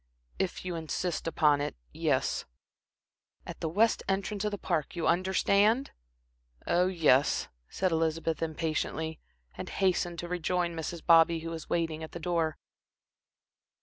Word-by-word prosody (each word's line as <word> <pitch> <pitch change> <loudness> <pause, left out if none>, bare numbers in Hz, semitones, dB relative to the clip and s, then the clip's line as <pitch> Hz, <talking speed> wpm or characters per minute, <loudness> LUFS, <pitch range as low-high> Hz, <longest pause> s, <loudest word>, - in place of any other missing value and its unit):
"If 185 -1 -2
you 180 - -2
insist 165 +1 -3
upon 150 -3 +3
it 145 - -3 0.2
yes." - - 0 1.0
"At - - -8
the 160 - -2
west 215 +7 +3
entrance 195 +1 -1
of 210 - +1
the 205 - -4
Park 170 -6 -2
you 170 - -2
understand?" 200 +7 +3 0.7
"Oh, 180 +1 +3
yes," 155 -7 +3 0.2
said 185 -1 0
Elizabeth 165 0 0
impatiently, 160 0 -2 0.4
and - - -6
hastened 180 -2 0
to 175 - -5
rejoin 175 0 -1
Mrs. 160 +1 -5
Bobby, 165 -1 +6
who 165 0 -5
was 165 -1 -7
waiting 165 -2 -1
at 160 - -8
the 170 - -5
door. 165 -2 0
170 Hz, 140 wpm, -30 LUFS, 160-185 Hz, 1.0 s, Bobby